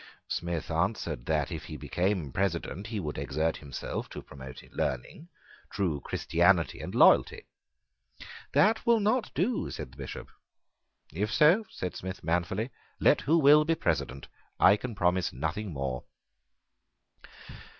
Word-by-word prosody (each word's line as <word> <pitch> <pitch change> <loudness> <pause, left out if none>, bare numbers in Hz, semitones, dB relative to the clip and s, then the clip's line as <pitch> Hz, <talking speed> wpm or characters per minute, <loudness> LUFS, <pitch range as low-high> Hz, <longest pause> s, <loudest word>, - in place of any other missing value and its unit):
Smith 85 -2 -3
answered 85 - -1
that, - - 0
if - - -5
he 75 - -7
became 85 +2 -1
President, 95 - -2
he 110 -2 -3
would 75 -6 -4
exert 75 +3 -1
himself 70 -2 -5
to - - -7
promote 65 -1 -10
learning, 65 - -3 0.4
true 90 -8 -1
Christianity, - - +2
and - - -6
loyalty. - - +5 1.1
"That 220 +2 +4
will 235 -1 +4
not 215 +3 +1
do," 225 +6 0
said 65 - -7
the 65 - -18
Bishop. 70 -2 -7 0.8
"If 105 +6 -1
so," 170 - +5
said 90 - -5
Smith 95 +1 -6
manfully, 90 - -1 0.3
"let - - +4
who 160 +4 +3
will 150 0 +7
be 165 +2 +1
President: 70 - -2 0.3
I 100 - +7
can 115 +1 -6
promise 90 -1 +1
nothing 90 - -3
more." 65 -3 -3
90 Hz, 135 wpm, -29 LUFS, 75-120 Hz, 1.1 s, will